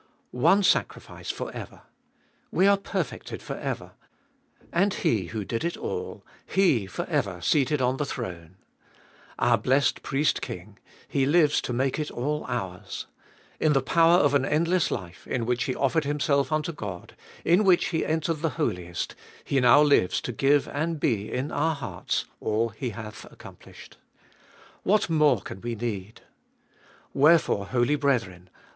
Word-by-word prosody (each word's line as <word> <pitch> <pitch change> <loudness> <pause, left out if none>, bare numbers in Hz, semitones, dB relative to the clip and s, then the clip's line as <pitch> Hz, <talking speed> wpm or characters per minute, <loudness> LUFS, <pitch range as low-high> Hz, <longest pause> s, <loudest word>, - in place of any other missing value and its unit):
2. - - -9
One 195 +10 +5
sacrifice 200 - 0
for - - -4
ever. - - -9 0.7
We 190 - +3
perfected 200 - -4
for - - -5
ever. - - -5 0.8
And 190 +3 +2
HE 105 -6 +1
who 105 +1 -4
did 115 +3 -3
it 170 +1 -2
all, 450 0 -5 0.2
HE 145 - +2
for 90 - -4
ever 90 -3 -1
seated 140 - +2
on 125 +1 +1
the 150 - -1
throne. 90 - -6 0.8
Our - - +3
blessed 135 +2 +2
Priest 140 +2 0
King, 95 +3 -8 0.3
Hs - - -24
Hues 145 +2 +3
to - - -4
matte 130 +4 0
it 150 - -2
all 150 +5 -2
ours. 90 -1 -4 0.5
In 155 -1 +3
the 135 - +3
power 165 +4 +5
of 145 -4 +3
an 140 -2 +3
endless 165 +5 +1
life, 90 -4 -6
in 120 -2 -1
which 120 0 0
He 130 - -2
offered 145 +3 +1
Himself 145 0 +1
unto 155 +2 0
God, 100 - -7 0.3
in 175 +5 +4
which 185 -3 +4
He 160 -2 0
entered 160 0 -1
the 155 -7 -2
Holiest, 90 -1 -2 0.3
He 140 - +1
now 125 +4 +6
Hues 115 -10 +3
to - - -4
glue 140 +4 +3
and 155 +2 -1
be 110 -7 0
in 130 +4 -2
our 160 +2 +1
hearts 140 - -3
all 110 +2 0
He 110 +4 -5
hath 110 0 -9
accomplished. - - -14 0.8
What 205 -3 +2
more 150 - +4
can 95 - -9
we 120 0 -3
need? 105 -3 -5 0.9
Wherefore, 145 -9 +4
holy 125 +5 +1
brethren 115 -11 -1
135 Hz, 155 wpm, -26 LUFS, 110-155 Hz, 0.9 s, now